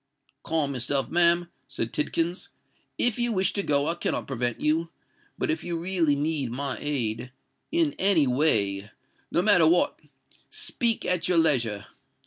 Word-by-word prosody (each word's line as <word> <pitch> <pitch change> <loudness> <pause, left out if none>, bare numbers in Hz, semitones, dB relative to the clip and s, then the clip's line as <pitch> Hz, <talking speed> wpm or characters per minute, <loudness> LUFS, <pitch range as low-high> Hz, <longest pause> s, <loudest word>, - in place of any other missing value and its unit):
"Calm 150 -4 0
yourself, 135 +2 -1
ma'am," 170 0 +3 0.2
said 120 -4 -5
Tidkins. 165 +4 -2 0.5
"If 245 -1 0
you 240 0 +1
wish 190 -3 +1
to 200 - -1
go, 145 -6 +1
I 165 - +1
cannot 175 - -2
prevent 120 -3 -2
you; 160 +2 0 0.5
but - - -1
if 320 - -3
you 170 -1 -3
really 170 -4 +2
need 145 -3 -1
my 135 +1 -3
aid—in 135 - -3
any 190 -6 +3
way—no 105 - 0
matter 180 -6 +5
what—speak 225 +6 -2
at 180 -1 0
your 180 -1 +2
leisure. 120 -11 +2
155 Hz, 135 wpm, -25 LUFS, 130-175 Hz, 0.5 s, matter